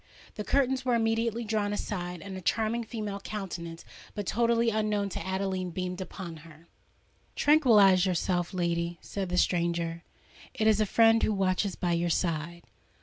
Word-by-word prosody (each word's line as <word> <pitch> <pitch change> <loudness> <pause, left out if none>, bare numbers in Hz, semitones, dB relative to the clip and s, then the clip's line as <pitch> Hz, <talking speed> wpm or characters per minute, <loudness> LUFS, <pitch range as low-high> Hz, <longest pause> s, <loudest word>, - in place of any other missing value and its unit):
The 210 - -5
curtains 265 +1 +1
were 250 -2 +2
immediately 230 0 0
drawn 215 -2 -1
aside; 180 -4 -4
and 195 -1 -7
a 185 - -6
charming 225 +5 0
female 210 -3 -5
countenance, 175 -5 -6 0.3
but 205 -2 -3
totally 235 +2 +2
unknown 210 -2 0
to - - -5
Adeline, 190 -1 -2
beamed 180 +1 -4
upon 180 -3 -7
her. 160 +1 -15 0.7
"Tranquillise 210 - +5
yourself, 175 -1 0
lady," 170 -1 -1
said 195 -3 -5
the 180 - -1
stranger: 170 -1 0 0.5
"it 215 - 0
is 220 -1 +4
a 215 - +2
friend 225 +2 +5
who - - +2
watches 195 -1 0
by 175 - -1
your 170 0 +1
side." 170 0 -1
195 Hz, 155 wpm, -29 LUFS, 175-220 Hz, 0.7 s, Tranquillise